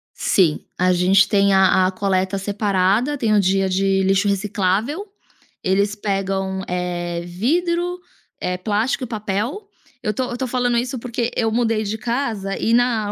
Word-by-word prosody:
Sim, 170 -6 +2 0.2
a 185 0 +3
gente 190 +2 +4
tem 200 -2 +3
a 190 -1 +4
a - - -1
coleta 190 0 0
separada, 200 +6 +1
tem 225 -5 +1
o - - +5
dia 195 0 +2
de 195 +1 +1
lixo 195 +2 +2
reciclável. 205 - 0 0.6
Eles 200 +2 +1
pegam, 195 -2 -2
eh, 175 -1 -3
vidro, 340 - -1 0.4
eh, 180 0 -2
plástico 215 +8 -1
e - - -3
papel. 220 - -3 0.4
Eu 210 - 0
estou 250 +4 -2
eu - - -4
estou 255 +2 -3
falando 245 -1 0
isso, 245 +1 -2
porque 235 0 -3
eu 225 -2 +1
mudei 225 -1 +1
de 215 +1 -3
casa 225 -5 -2
e 230 - 0
na 235 -4 +2
205 Hz, 160 wpm, -20 LUFS, 190-235 Hz, 0.6 s, o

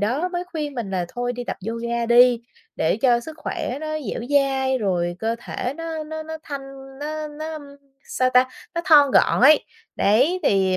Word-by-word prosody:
đó 260 - 0
mới 355 0 -3
khuyên 310 -5 -5
mình 225 -6 -4
là 180 -2 -1
thôi 245 +3 -3
đi 245 0 -6
tập - - -4
yoga 235 0 -2
đi, 240 0 +5 0.3
để 160 - +1
cho 240 0 +3
sức 315 +5 -9
khỏe 275 -3 -4
nó 310 - -5
dẻo 240 -6 -4
dai 270 -2 +2
rồi 175 -4 -1
cơ 225 +1 -1
thể 250 +2 -4
nó 325 -1 -5
nó 315 +1 -6
nó 320 0 -6
thanh 270 -1 -9
nó 305 +1 -4
nó, 310 +2 -6
ưm, 305 -2 -7 0.5
sao 255 0 +1
ta, 255 +1 +4 0.3
nó 340 - 0
thon 290 -4 +6
gọn - - +3
ấy. 295 +4 +6 0.3
Đấy, 265 - +3
thì 190 -6 +2
265 Hz, 195 wpm, -22 LUFS, 235-305 Hz, 0.5 s, thon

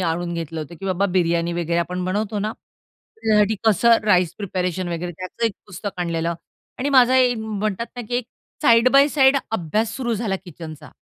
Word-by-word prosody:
आणून 170 0 -1
घेतलं 165 -1 -4
होतं, 155 +2 -8
की - - -7
बाबा 190 +1 +1
बिर्याणी 170 -1 +1
वगैरे 170 0 -1
आपण 180 +1 -2
बनवतो 205 +3 -1
ना, 210 +2 -2 0.7
त्याच्यासाठी 210 0 +3
कसं 230 +2 +5
राईस 180 -5 +3
प्रिपरेशन 185 -2 -2
वगैरे, 175 +1 -4
त्याचं 185 +7 -5
1 225 - -2
पुस्तक 200 +1 -6
आणलेलं 170 -1 -1 0.4
आणि 275 - -1
माझा 260 -1 +5
एक 250 -2 +4
म्हणतात 215 0 -3
ना, 245 - -4
की 245 - -3
एक 245 - -2 0.4
साइड 235 -3 +6
बाय 275 +1 +6
साइड 275 -2 +4 0.2
अभ्यास 215 +4 -1
सुरू 240 -3 -1
झाला 205 -3 -1
किचनचा. 160 -3 -10
195 Hz, 180 wpm, -22 LUFS, 170-230 Hz, 0.7 s, साइड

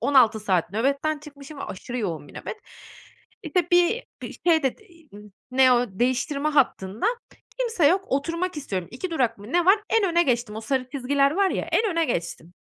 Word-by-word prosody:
16 245 -6 +4
saat 185 -4 0
nöbetten 280 +7 0
çıkmışım 285 -1 -12
ve - - -5
aşırı 245 +6 -6
yoğun 165 -9 -4
bir - - -16
nöbet. - - -6 0.9
İşte, 355 -3 0
bir 355 +8 +3 0.2
bir - - -6
şey 320 -3 +4
de 265 - 0 0.4
n 205 - -11 0.3
ne 255 0 +5
o, 245 0 +3
değiştirme 260 +8 0
hattında 245 - +1 0.5
kimse 455 -11 +2
yok, 380 +5 +3
oturmak 335 +5 -1
istiyorum, 190 - -4
2 340 +8 -5
durak 245 -8 0
mı 205 +6 -11
ne 350 0 +3
var, 405 +3 +5
en 450 -3 +3
öne 340 +1 +4
geçtim. 235 -6 -1
O - - -4
sarı 255 +2 -2
çizgiler 275 +1 +1
var 390 +4 +2
ya, - - -2
en 430 -4 +2
öne 330 0 +1
geçtim. 170 - -4
275 Hz, 185 wpm, -24 LUFS, 235-335 Hz, 0.9 s, ne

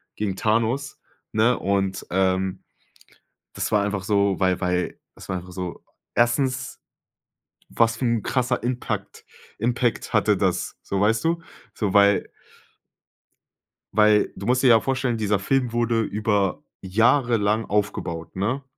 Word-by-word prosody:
gegen 100 -3 -2
Thanos, 115 +5 0 0.3
ne? 110 +3 +3
Und, 95 -1 -1
ähm, 95 0 0 0.9
das - - -3
war 105 -1 +3
einfach 100 -2 -2
so, 100 -2 +1
weil 95 -1 +2
weil, 90 -1 -1 0.2
es - - -13
war 95 - -1
einfach 90 +1 -9
so 90 -2 -6 0.3
erstens, 130 +2 +1 0.9
was 115 -1 +2
für 125 - -2
'n 115 -3 +1
krasser 125 -2 0
Impact- 125 0 -4 0.3
Impact 120 0 0
hatte - - +3
das? - - -1
So, 100 - -2
weißt 110 +5 +2
du? 165 0 +1 0.3
So, 105 -4 -1
weil 100 0 +4 1.6
weil 105 0 +4
du - - -7
musst 125 +2 +2
dir - - +6
ja 115 -1 +7
vorstellen, 130 -3 -1
dieser 105 -2 +1
Film 125 +2 0
wurde 120 -1 +1
über 105 -2 0 0.2
jahrelang 110 +1 +2
aufgebaut, 90 -5 -2
ne? 115 +9 -1
105 Hz, 135 wpm, -23 LUFS, 95-120 Hz, 1.6 s, ja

